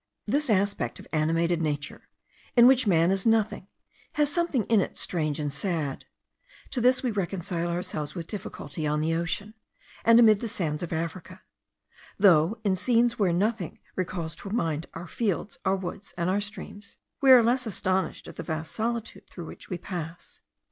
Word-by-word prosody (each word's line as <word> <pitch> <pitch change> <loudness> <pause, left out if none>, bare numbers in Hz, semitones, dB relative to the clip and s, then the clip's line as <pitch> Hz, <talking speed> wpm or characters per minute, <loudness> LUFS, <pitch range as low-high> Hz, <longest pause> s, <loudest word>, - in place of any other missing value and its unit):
This 290 -1 0
aspect 200 -1 +1
of - - -11
animated 165 +2 +1
nature, 145 -3 -3 0.5
in 240 -1 +8
which 255 -2 +5
man 170 -1 +4
is 195 0 +1
nothing, 220 -4 +1 0.5
has 295 -1 +1
something 340 -9 +1
in 220 -2 +3
it - - -4
strange 155 -4 -1
and 145 -2 -2
sad. 155 -3 -2 0.7
To 250 - -1
this 255 +2 +4
we 250 - +1
reconcile 180 -3 -2
ourselves 170 -3 -3
with 170 -2 -4
difficulty 160 -6 -5
on 150 0 +1
the 160 +2 0
ocean, 170 +6 -2 0.5
and 230 0 +7
amid 215 -3 +6
the 230 - -3
sands 165 -8 -2
of 175 - -4
Africa; 175 +3 -5 0.7
though 190 0 +5
in 195 -3 +2
scenes 235 +3 +2
where 190 -4 +3
nothing 195 0 -1 0.2
recalls 175 -3 -3
to 195 - -8
mind 165 -7 -1
our 175 - -6
fields, 205 +1 -2
our 190 - +3
woods, 190 +1 -7
and 170 +1 0
our 200 +2 +1
streams, 205 0 -8 0.2
we 270 - +4
are 255 -2 +9
less 245 +1 +1
astonished 190 -2 -1
at - - -11
the - - -3
vast 160 -1 -4
solitude 230 0 -3
through 175 - -8
which - - -11
we 180 - -2
pass. 175 -2 -7
185 Hz, 175 wpm, -27 LUFS, 165-220 Hz, 0.7 s, are